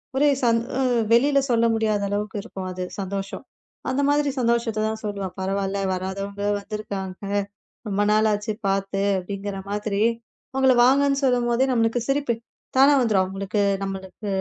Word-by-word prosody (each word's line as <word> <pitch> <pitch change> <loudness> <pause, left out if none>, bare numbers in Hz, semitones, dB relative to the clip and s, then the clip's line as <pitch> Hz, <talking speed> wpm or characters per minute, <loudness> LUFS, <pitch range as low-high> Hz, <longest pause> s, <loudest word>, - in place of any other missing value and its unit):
ஒரே 290 +2 +4
சந் 230 -1 +4 0.2
அ, - - 0 0.3
வெளியில் 275 +3 +4
சொல்ல 230 -1 +3
முடியாத 215 -2 +1
அளவுக்கு 205 +1 -2
இருக்கும் 195 -4 -7
அது 180 0 -4 0.2
சந்தோஷம். 195 0 -4 0.5
அந்த 265 +2 0
மாதிரி 290 0 +2
சந்தோஷத்தை 235 -2 +1
தான் 220 0 -3
சொல்லுவேன் 200 -3 -4
பரவாயில்லை, 195 +1 -1
வராதவங்க 195 +2 -4 0.2
வந்திருக்காங்க, 200 -2 -6 0.6
ரொம்ப 205 0 0
நாளாச்சு 215 0 +2 0.2
பார்த்து 195 0 0 0.2
அப்படின்கிற 195 +1 -5
மாதிரி 205 0 -1 0.5
அவங்களை 265 -1 +4
வாங்க 270 +2 +5
என்று 275 0 +1
சொல்லும்போதே 245 0 +2
நம்மளுக்கு 230 0 +2
சிரிப்பு 275 -3 +1 0.4
தானாக 280 +2 +7
வந்துவிடும், 210 -5 +3
அவங்களுக்கு 195 +2 -2 0.2
நம்மளுக்கு 195 +1 -6
210 Hz, 135 wpm, -24 LUFS, 195-240 Hz, 0.6 s, தானாக